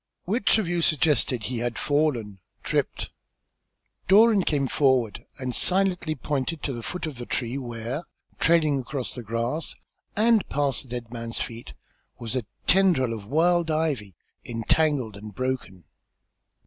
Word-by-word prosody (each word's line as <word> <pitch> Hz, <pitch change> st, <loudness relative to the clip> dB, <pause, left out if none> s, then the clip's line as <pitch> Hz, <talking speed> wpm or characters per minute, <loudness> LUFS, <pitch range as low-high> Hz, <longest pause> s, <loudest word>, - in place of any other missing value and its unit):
"Which 210 Hz, +3 st, +3 dB
of 215 Hz, -5 st, 0 dB
you 175 Hz, 0 st, 0 dB
suggested 145 Hz, -6 st, +2 dB
that -, -, -2 dB
he 125 Hz, -2 st, -2 dB
had 120 Hz, -1 st, -2 dB
fallen 130 Hz, -10 st, 0 dB, 0.2 s
tripped?" -, -, -1 dB, 1.0 s
Doran 210 Hz, +1 st, +6 dB
came 145 Hz, -4 st, +1 dB
forward 130 Hz, -6 st, +1 dB
and 130 Hz, -2 st, -3 dB
silently 180 Hz, -3 st, +2 dB
pointed 145 Hz, +2 st, -2 dB
to 140 Hz, -, -1 dB
the 120 Hz, -, -5 dB
foot 180 Hz, +10 st, -4 dB
of 145 Hz, -6 st, -6 dB
the 120 Hz, -, -6 dB
tree, 120 Hz, 0 st, -2 dB
where, 120 Hz, +4 st, -5 dB, 0.3 s
trailing 155 Hz, -4 st, +3 dB
across 130 Hz, 0 st, -4 dB
the 125 Hz, -, -6 dB
grass, 115 Hz, +8 st, -2 dB, 0.4 s
and 220 Hz, -1 st, +3 dB
past 140 Hz, -2 st, 0 dB
the -, -, -18 dB
dead 120 Hz, -1 st, -6 dB
man's 115 Hz, -1 st, -4 dB
feet, 115 Hz, 0 st, -6 dB, 0.4 s
was 115 Hz, +1 st, -4 dB
a 120 Hz, -5 st, -2 dB, 0.2 s
tendril 175 Hz, -11 st, +4 dB
of 105 Hz, -3 st, -7 dB
wild 170 Hz, +5 st, +2 dB
ivy 145 Hz, -, -1 dB, 0.3 s
entangled 120 Hz, 0 st, +1 dB
and 105 Hz, 0 st, -10 dB
broken. 130 Hz, -8 st, -3 dB
135 Hz, 150 wpm, -26 LUFS, 115-160 Hz, 1.0 s, Doran